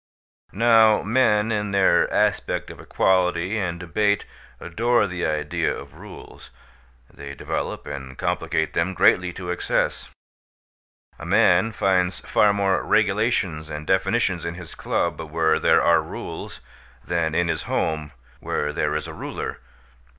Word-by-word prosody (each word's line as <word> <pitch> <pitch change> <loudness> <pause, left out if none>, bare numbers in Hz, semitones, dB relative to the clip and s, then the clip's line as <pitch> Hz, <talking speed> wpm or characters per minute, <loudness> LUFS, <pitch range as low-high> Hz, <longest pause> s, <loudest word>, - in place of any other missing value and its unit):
Now 110 0 +4
men 110 -1 +2
in 105 -1 -1
their 100 -1 +3
aspect - - 0
of - - -13
equality 90 +2 +1
and 85 -3 -3
debate 100 +4 0 0.3
adore 115 +6 +1
the 90 -2 -3
idea 75 -1 -1
of - - -8
rules; - - -13 0.6
they 70 0 -9
develop - - -4
and 65 -2 -8
complicate 80 -1 -1
them 90 +3 -1
greatly 90 0 +3
to 90 -1 -5
excess. 90 - -1 1.1
A - - -8
man 90 +6 +4
finds 95 -3 +1
far 105 - +3
more 100 -2 +1
regulations 80 +1 0
and 75 0 -6
definitions 95 -1 +1
in 85 +1 -4
his 90 -2 -10
club, - - -2
where 80 0 +1
there - - +3
are - - +4
rules, - - -8 0.4
than 80 -2 -1
in 90 0 +2
his 80 -2 -2
home, 75 -2 -1 0.3
where 75 0 -2
there 75 0 -1
is 75 +1 -3
a 80 - -8
ruler. - - -6
90 Hz, 135 wpm, -23 LUFS, 80-100 Hz, 1.1 s, Now